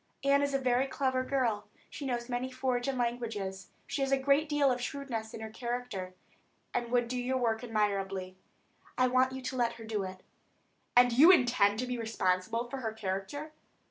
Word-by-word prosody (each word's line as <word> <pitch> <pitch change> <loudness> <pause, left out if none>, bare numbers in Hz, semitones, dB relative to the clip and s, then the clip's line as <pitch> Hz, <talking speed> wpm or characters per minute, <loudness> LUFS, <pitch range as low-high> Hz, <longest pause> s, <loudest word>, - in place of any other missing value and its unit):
Annie 280 +1 +4
is 280 -1 -2
a - - +5
very 255 0 +2
clever 260 -1 0
girl; 245 -6 0 0.2
she 280 - -6
knows 240 -2 -2
many 255 +1 -2
foreign 255 0 -1
languages, 225 -6 -3 0.2
she 280 0 -3
has 270 0 0
a 275 - +5
great 280 +3 +2
deal 290 -2 +3
of 250 0 -1
shrewdness 245 -5 -4
in 225 - -8
her 220 0 -6
character, 235 -6 -4 0.6
and 240 -1 -1
would 240 -1 +2
do 250 +1 -2
your 260 +1 0
work 230 -2 0
admirably. 195 -4 -1 0.6
I 255 - +4
want 255 +1 +3
you 260 0 -6
to 260 - -3
let 240 -2 +1
her 225 - -11
do 220 -2 -2
it." 185 -1 -7 0.7
"And 245 0 +6
you 290 +8 +8
intend 240 - +5
to - - -1
be 250 -1 -3
responsible 220 +1 0
for 270 - -5
her 225 -4 -3
character?" 220 +9 -4
245 Hz, 190 wpm, -31 LUFS, 220-260 Hz, 0.7 s, you